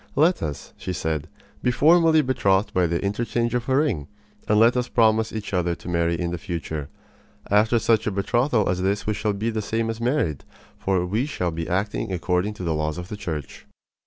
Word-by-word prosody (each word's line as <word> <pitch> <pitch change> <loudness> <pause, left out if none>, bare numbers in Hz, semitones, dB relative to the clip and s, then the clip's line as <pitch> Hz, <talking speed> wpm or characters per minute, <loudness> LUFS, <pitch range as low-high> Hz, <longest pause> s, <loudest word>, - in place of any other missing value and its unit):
"Let 160 +6 +3
us," 75 -3 -5
she 90 - -4
said, 80 -2 -2 0.3
"be - - +1
formally 160 +3 +5
betrothed 100 -6 +1
by 90 -1 +3
the 85 +3 -1
interchange 120 +3 -1
of 125 +1 -2
a 130 - +3
ring, 110 - 0 0.4
and 105 0 +4
let 115 +2 +5
us 125 0 0
promise 110 -1 +3
each 105 -2 -5
other 90 -2 +1
to - - -13
marry 85 -1 0
in 85 -1 -1
the 85 - -4
future. 80 -6 -5 0.6
After 110 +3 +4
such 110 -1 +2
a - - +1
betrothal 115 +4 +1
as 90 0 0
this 100 +2 0
we 105 - 0
shall 105 0 -1
be 110 +3 -2
the 110 -1 -2
same 115 +2 -1
as 115 +1 -7
married; 120 - 0 0.4
for 95 -2 +1
we 110 +9 -1
shall 90 - -2
be 80 0 -4
acting 100 +2 -1
according 90 +3 0
to 95 - -7
the 85 -2 0
laws 75 0 -2
of 90 +1 -7
the 105 - -4
Church." 80 -8 -6
100 Hz, 210 wpm, -24 LUFS, 85-115 Hz, 0.6 s, formally